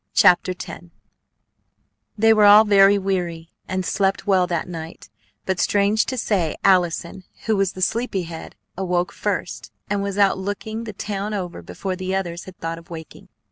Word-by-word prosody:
CHAPTER 180 +1 +5
X 175 - -9 1.3
They 225 +1 +5
were 215 -1 +5
all 205 +1 +9
very 200 -1 +5
weary, 175 -4 -3 0.2
and 185 0 -2
slept 195 0 0
well 185 -3 +3
that 170 -2 -2
night; 165 -1 -8 0.4
but, 190 -2 -1
strange 205 +2 +2
to 260 - -3
say, 190 -9 0
Allison, 180 -1 +2 0.2
who 220 - +2
was 195 -2 0
the 185 - -3
sleepy 225 -3 -1
head, 165 -1 -9 0.2
awoke 180 0 -1
first, - - -4 0.2
and 205 -1 +1
was 200 0 -3
out 195 -2 +3
looking 215 +3 -4
the 215 - -6
town 205 +1 -4
over 180 -3 -5
before 190 -2 -5
the 185 +1 -3
others 175 -3 -3
had 185 -1 -12
thought 165 0 -4
of 165 - -19
awaking. 160 -2 -10
190 Hz, 170 wpm, -22 LUFS, 175-205 Hz, 1.3 s, all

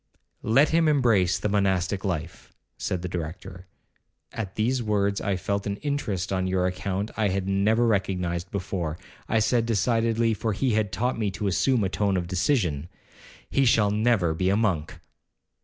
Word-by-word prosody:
'Let 135 +7 +4
him 165 0 +3
embrace 115 -11 +3
the - - -2
monastic 95 -1 0
life,' 85 -3 -4 0.2
said 90 -1 -3
the - - -2
Director. 90 +2 -6 0.7
At 100 -4 -5
these 120 +4 0
words 100 -2 0
I 100 -2 0
felt 100 +2 -2
an 100 - -1
interest 110 - -2
on 95 0 0
your 95 -1 +1
account 95 +3 -2
I 110 -2 +2
had 95 0 -1
never 105 +5 +2
recognized 90 -5 -1
before. 90 -5 -3 0.3
I 110 - +2
said 115 +1 +2
decidedly, 115 +1 +1
for 110 +1 -2
he 130 +6 0
had 105 -2 0
taught 120 +6 -1
me 105 -2 0
to 100 +2 -5
assume 115 +5 +2
a 95 - 0
tone 100 0 0
of 90 - -2
decision, 90 - 0 0.6
'He 135 - +3
shall 110 -4 +3
never 105 -6 +2
be 90 +3 0
a 100 - +2
monk.' 95 -9 -1
100 Hz, 170 wpm, -25 LUFS, 90-115 Hz, 0.7 s, Let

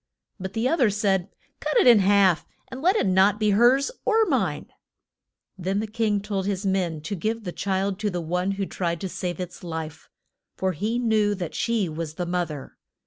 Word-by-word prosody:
But 190 0 -5
the 225 +3 0
oth 330 +4 +1
er 235 - +5
said, 195 -2 0 0.3
Cut - - -1
it 455 - +5
in 235 -4 +8
half, 195 -3 +3 0.2
and 260 0 -7
let 365 +6 +3
it - - +2
not 190 +2 +3
be 215 -1 +2
hers 245 - +4
or 445 0 +3
mine. - - 0 0.9
Then 190 +3 -1
the 215 - -1
king 215 -2 0
told 200 -2 -3
his 200 0 -2
men 180 -5 0
to 200 - -5
give 220 +5 -2
the 180 - -4
child 195 +1 -1
to 210 0 0
the 180 -2 -3
one 180 +4 -1
who 195 0 -2
tried 170 -3 -2
to 190 - -2
save 175 -1 -4
its 180 -1 -7
life, 160 -2 -6 0.5
for 190 0 0
he 210 +8 -2
knew 215 -4 +2
that 175 -4 -5
she 230 -5 0
was 160 -1 -5
the 175 - -3
moth 175 -1 -1
er. 145 -3 -9
195 Hz, 205 wpm, -25 LUFS, 180-215 Hz, 0.9 s, in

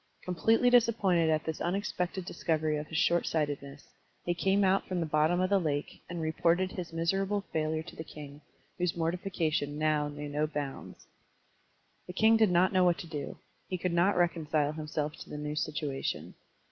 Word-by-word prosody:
Completely 225 +7 +3
disappointed 210 -9 +4
at 155 -1 +2
this 160 -1 -4
tmexpected 180 -1 -2
discovery 155 -3 0
of 150 0 -5
his 160 - -4
shortsightedness, 145 -4 0 0.4
he 175 - +1
came 195 +3 +2
out 190 +1 +2
from 185 -1 -2
the 165 - 0
bottom 155 +3 +2
of 185 +1 +1
the 200 - +5
lake, 145 -4 -3
and 175 -1 -4
reported 170 +3 +1
his 175 -3 -6
miserable 195 +5 0
failure 155 0 0
to - - -11
the 160 - -6
king, 145 -2 -10 0.4
whose 175 -1 0
mortification 165 -4 -1
now 155 -1 +1
knew 145 0 -6
no 150 +1 0
bounds. 145 -3 -6 1.0
The 180 - -6
king 220 +4 +5
did 220 -2 +4
not 180 +2 +3
know 185 -1 +4
what 175 -1 +4
to 170 - -7
do; 150 -4 -5 0.3
he 185 - -2
could 180 0 -2
not 175 +3 +3
reconcile 155 -4 +1
himself 150 0 -3
to - - -11
the 150 - -6
new 150 0 -4
situation. 150 -3 -3
165 Hz, 175 wpm, -30 LUFS, 150-185 Hz, 1.0 s, the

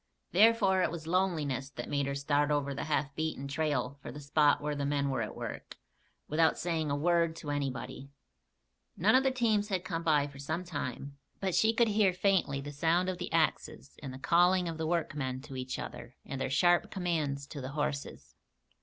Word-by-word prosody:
Therefore 200 -1 +5
it - - +2
was 165 -1 -6
loneliness 160 -7 0
that - - -7
made 140 -1 0
her 140 - -2
start 145 +1 +1
over 145 -1 0
the 140 - -4
half 145 -2 -1
beaten 155 -2 -3
trail 140 -2 -1
for - - -7
the 150 - -8
spot 145 +1 +3
where 150 0 -2
the 145 -1 -3
men 140 -1 0
were 130 -3 -1
at 110 - -4
work, - - -7 0.5
without 160 +1 +3
saying 160 -3 -1
a 140 - +1
word 170 +2 +2
to 150 -3 -5
anybody. 135 -1 -4 0.9
None 205 +6 +4
of 260 - +6
the 265 - +2
teams 225 -5 +1
had 185 -4 -2
come 165 0 -2
by 150 -4 +3
for 140 -1 -10
some 160 +5 -3
time; 140 -4 -5 0.2
but 190 -2 -1
she 220 +5 +4
could 230 0 +3
hear 205 -3 +3
faintly 180 -7 +1
the 145 +1 -6
sound 165 +5 +1
of 185 - -4
the - - -5
axes - - -1
and 135 - -6
the 130 - -8
calling 175 +5 +3
of 165 -1 -5
the 160 - -1
workmen 145 -6 -1
to 140 -1 -10
each 130 0 -4
other - - -8
and 135 -1 -5
their - - -1
sharp 175 +6 +3
commands 155 -7 -2
to 140 0 -8
the 130 +2 -6
horses. 145 -1 -4
150 Hz, 205 wpm, -31 LUFS, 140-175 Hz, 0.9 s, of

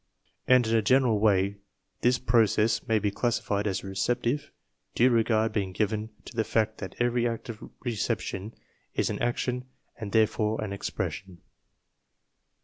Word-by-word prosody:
And 125 -2 +6
in 110 +1 +1
a 110 - +4
general 125 -1 +3
way 100 -1 +2 0.4
this 125 0 +3
process 115 -1 +2
may 110 - +3
be 105 -1 0
classified 110 -2 -1
as 95 - -2
receptive 120 +8 -1 0.5
(due 125 +2 +5
regard 110 -1 +2
being 95 -3 -1
given 105 +2 -1 0.2
to - - -11
the 110 - +2
fact 110 0 0
that 95 -2 -7
every 120 0 +1
act 115 +2 -5
of 110 -2 -8
reception 110 -3 -3 0.4
is - - +1
an - - -4
action 125 +1 -1 0.3
and 105 -3 -6
there 110 -1 +5
fore 110 0 -1
an 100 -2 -4
expression) 95 -2 -5
110 Hz, 150 wpm, -28 LUFS, 105-120 Hz, 0.5 s, And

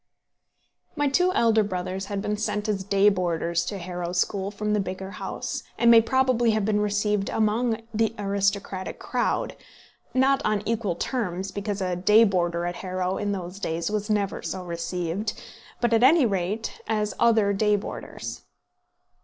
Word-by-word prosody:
] - - -48 0.3
My 290 -1 +1
two 360 +6 +3
elder 225 -6 +4
brothers 185 -1 -3
had 200 -1 -3
been 210 - -1
sent 210 0 -2
as 200 -3 -1
day 200 +1 +3
boarders 170 -3 +1
to 205 - -4
Harrow 175 -1 -5
School 190 +2 0
from 210 +1 -2
the 210 - +2
bigger 190 0 -4
house, 185 - -4 0.2
and 235 0 +5
may 230 -1 +8
probably 255 -1 +2
have 210 - 0
been 210 -1 +1
received 210 -1 0
among 225 +1 +1
the 225 0 +1
aristocratic 200 -1 -1
crowd, - - -1 0.6
not 270 +1 +3
on 210 -1 0
equal 215 -6 0
terms, 190 -3 -2
because 200 0 -3
a 180 -1 0
day 210 +5 +5
boarder 175 -4 +1
at 175 0 -3
Harrow 185 0 -2
in 205 -1 -1
those 185 -1 -5
days 170 0 -2
was 210 0 -2
never 205 -2 0
so 185 - -4
received, 180 +5 -3 0.4
but 240 -1 +1
at 225 - +4
any 280 +3 +6
rate 200 +2 -2
as 215 -1 0
other 220 -3 +4
day 210 +1 +3
boarders. 205 - -6
205 Hz, 165 wpm, -25 LUFS, 185-220 Hz, 0.6 s, may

